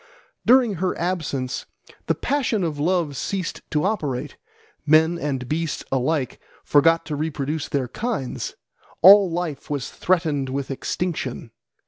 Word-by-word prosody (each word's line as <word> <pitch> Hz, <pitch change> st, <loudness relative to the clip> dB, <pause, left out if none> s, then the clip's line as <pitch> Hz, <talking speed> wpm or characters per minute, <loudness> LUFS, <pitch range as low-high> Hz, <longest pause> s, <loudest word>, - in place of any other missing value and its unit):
During 245 Hz, -3 st, +6 dB
her 185 Hz, -1 st, 0 dB
absence 160 Hz, -8 st, -2 dB, 0.4 s
the -, -, +2 dB
passion 255 Hz, -8 st, 0 dB
of 155 Hz, -4 st, -2 dB
love 165 Hz, -2 st, +1 dB
ceased 185 Hz, +5 st, -3 dB
to 150 Hz, -, 0 dB
operate: 150 Hz, -, -2 dB, 0.5 s
men 160 Hz, +3 st, +4 dB
and 135 Hz, -5 st, -3 dB
beasts 160 Hz, +2 st, -2 dB
alike 135 Hz, +1 st, 0 dB, 0.2 s
forgot 165 Hz, +3 st, +4 dB
to 155 Hz, -2 st, -3 dB
reproduce 150 Hz, 0 st, -3 dB
their 135 Hz, -4 st, -1 dB
kinds: 210 Hz, -, -3 dB, 0.5 s
all 195 Hz, +1 st, +9 dB
life 165 Hz, -4 st, -4 dB
was 145 Hz, -3 st, -3 dB
threatened 155 Hz, -7 st, 0 dB
with 140 Hz, +1 st, -3 dB
extinction. 135 Hz, -5 st, -3 dB
160 Hz, 125 wpm, -23 LUFS, 140-180 Hz, 0.5 s, all